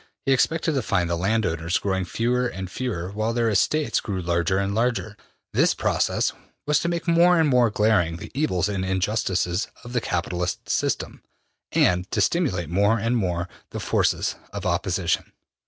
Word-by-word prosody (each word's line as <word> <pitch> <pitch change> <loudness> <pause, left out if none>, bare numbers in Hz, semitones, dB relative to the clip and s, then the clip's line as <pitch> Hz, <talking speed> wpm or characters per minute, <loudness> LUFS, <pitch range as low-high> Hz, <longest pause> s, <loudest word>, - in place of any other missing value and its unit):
He 135 - +2
expected 160 +4 +1
to 135 - +1
find 90 -6 0
the 85 - 0
landowners 90 -3 0
growing 95 -2 -1
fewer 125 +5 0
and 95 -5 -6
fewer 95 -8 -3
while 110 +3 -1
their 115 -1 +1
estates 150 +9 +2
grew 100 -3 -4
larger 85 +1 0
and 100 0 0
larger. 115 -1 0 0.4
This - - +3
process - - 0 0.3
was 150 0 +3
to - - -2
make 170 +1 -2
more 170 +1 +5
and 160 - +4
more 125 -4 +4
glaring 105 -6 +2
the - - -9
evils 120 - 0
and 100 -2 -2
injustices 95 -1 0 0.2
of 120 0 -9
the 125 - +1
capitalist 90 -4 -2
system, - - -1 0.5
and 90 +1 +2
to - - -1
stimulate 95 - +1
more 100 +6 +3
and 115 +3 0
more 90 -5 -1 0.2
the - - -5
forces - - 0
of - - -6
opposition. - - -1
105 Hz, 170 wpm, -24 LUFS, 90-125 Hz, 0.5 s, more